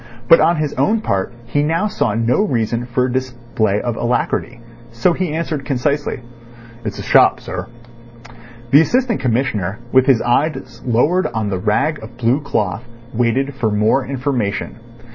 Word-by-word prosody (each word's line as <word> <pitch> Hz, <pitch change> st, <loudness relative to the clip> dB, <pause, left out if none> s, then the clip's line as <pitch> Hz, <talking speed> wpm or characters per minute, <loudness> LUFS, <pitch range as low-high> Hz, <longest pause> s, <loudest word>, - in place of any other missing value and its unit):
But, 165 Hz, -, +8 dB
on 170 Hz, -, +4 dB
his 155 Hz, -2 st, -2 dB
own 215 Hz, +11 st, +2 dB
part, 100 Hz, -, -1 dB
he 145 Hz, +5 st, 0 dB
now 165 Hz, +6 st, +1 dB
saw 120 Hz, -, -1 dB
no 115 Hz, -, +2 dB
reason 120 Hz, -, -1 dB
for 125 Hz, +1 st, 0 dB
a 130 Hz, -, -2 dB
display 120 Hz, -5 st, -1 dB
of 120 Hz, 0 st, -3 dB
alacrity. 120 Hz, 0 st, -1 dB, 0.3 s
So 115 Hz, +10 st, +2 dB
he 180 Hz, -2 st, -2 dB
answered 155 Hz, -2 st, -3 dB
concisely: 140 Hz, 0 st, -1 dB, 0.6 s
"It's -, -, -4 dB
a -, -, -6 dB
shop, -, -, +4 dB
sir." -, -, -6 dB, 1.0 s
The 145 Hz, -, +8 dB
Assistant 245 Hz, +5 st, +1 dB
Commissioner, 115 Hz, -6 st, -1 dB
with 130 Hz, +1 st, +4 dB
his 130 Hz, -4 st, +5 dB
eyes 120 Hz, -1 st, -1 dB
lowered 145 Hz, +10 st, +2 dB
on 110 Hz, -3 st, -3 dB
the 95 Hz, -, -2 dB
rag 135 Hz, +10 st, 0 dB
of 115 Hz, +2 st, -11 dB
blue 125 Hz, +4 st, +1 dB
cloth, 105 Hz, -7 st, -2 dB, 0.3 s
waited 125 Hz, +4 st, 0 dB
for 120 Hz, -4 st, -1 dB
more 110 Hz, +6 st, +2 dB
information. 125 Hz, -7 st, -2 dB
125 Hz, 160 wpm, -18 LUFS, 115-145 Hz, 1.0 s, But